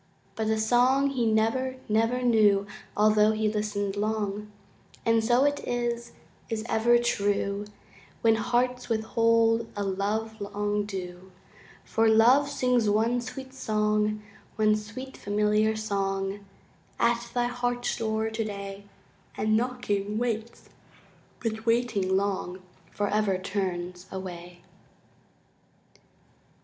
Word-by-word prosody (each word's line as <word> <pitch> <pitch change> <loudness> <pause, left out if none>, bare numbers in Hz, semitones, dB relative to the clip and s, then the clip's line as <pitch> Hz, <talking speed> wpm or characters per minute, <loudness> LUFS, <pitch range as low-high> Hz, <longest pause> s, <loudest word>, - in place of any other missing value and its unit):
But 220 -1 -2
the 220 0 +1
song 250 +5 +3
he 245 -4 0
never, 230 +4 +1
never 225 +4 +1
knew 210 -4 +4 0.3
Altho' 215 0 +4
he 215 0 0
listened 205 -2 -2
long, 210 0 -2 0.5
And 230 -1 +3
so 240 +3 +4
it 290 0 +2
is 240 -1 -3 0.4
is 220 -1 -3
ever 240 +1 +4
true 205 -3 0 0.6
When 225 -1 +5
hearts 245 +2 0
withhold 225 0 +2
a 205 - -2
love 210 +3 -2
long 205 0 -2
due; 185 -1 -7 0.5
For 225 0 +2
Love 245 +6 +5
sings 250 -5 +1
one 225 +4 +2
sweet 265 +2 -8
song, 210 -3 0 0.3
One 215 -1 +3
sweet 225 +6 -7
familiar 210 +1 +1
song, 200 -2 -2 0.5
At 235 0 +1
thy 245 0 +2
heart's 245 0 -1
door 220 0 -1
today, 200 -3 -5 0.5
And 215 0 +2
knocking, 215 -4 -1
waits, 230 -1 -3 0.7
but 220 0 -3
waiting 230 -5 +2
long 190 -2 -2 0.3
Forever 205 -1 0
turns 185 -2 -4
away. 175 -2 -8
220 Hz, 110 wpm, -27 LUFS, 205-235 Hz, 0.7 s, When